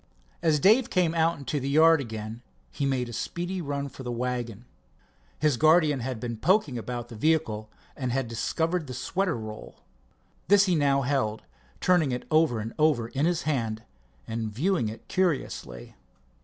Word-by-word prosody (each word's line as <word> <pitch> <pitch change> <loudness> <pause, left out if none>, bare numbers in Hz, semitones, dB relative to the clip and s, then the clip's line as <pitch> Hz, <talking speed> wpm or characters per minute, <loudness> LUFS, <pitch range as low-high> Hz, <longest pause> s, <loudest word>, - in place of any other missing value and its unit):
As 155 -3 +3
Dave 225 - +5
came 175 -3 +2
out 165 0 +2
into 140 +1 -3
the 135 +1 -3
yard 160 +1 +5
again 110 -1 -6 0.3
he 140 - -2
made 130 -2 0
a 120 - -8
speedy 175 +9 -3
run 140 -2 -3
for 135 - -11
the 125 -2 -4
wagon. 120 -2 -3 0.7
His 150 -5 +2
guardian 155 -2 +4
had 125 -1 -4
been 115 0 -4
poking 175 - +2
about 120 0 -5
the 115 - -9
vehicle, 110 -6 0 0.3
and 130 -4 -3
had 130 0 -1
discovered 160 +8 -1
the 125 - -6
sweater 190 0 -1
roll. 110 -1 -9 0.6
This 200 +1 +6
he 185 - +1
now 140 -3 +2
held, 125 -5 -1 0.4
turning 175 -7 +3
it 125 - -3
over 155 -7 +3
and 110 +2 -5
over 145 -7 +2
in 140 +6 0
his 175 -2 0
hand 115 -7 -1 0.4
and 115 -1 -3
viewing 145 - 0
it 110 - -10
curiously. 135 - -2
135 Hz, 170 wpm, -27 LUFS, 115-160 Hz, 0.7 s, This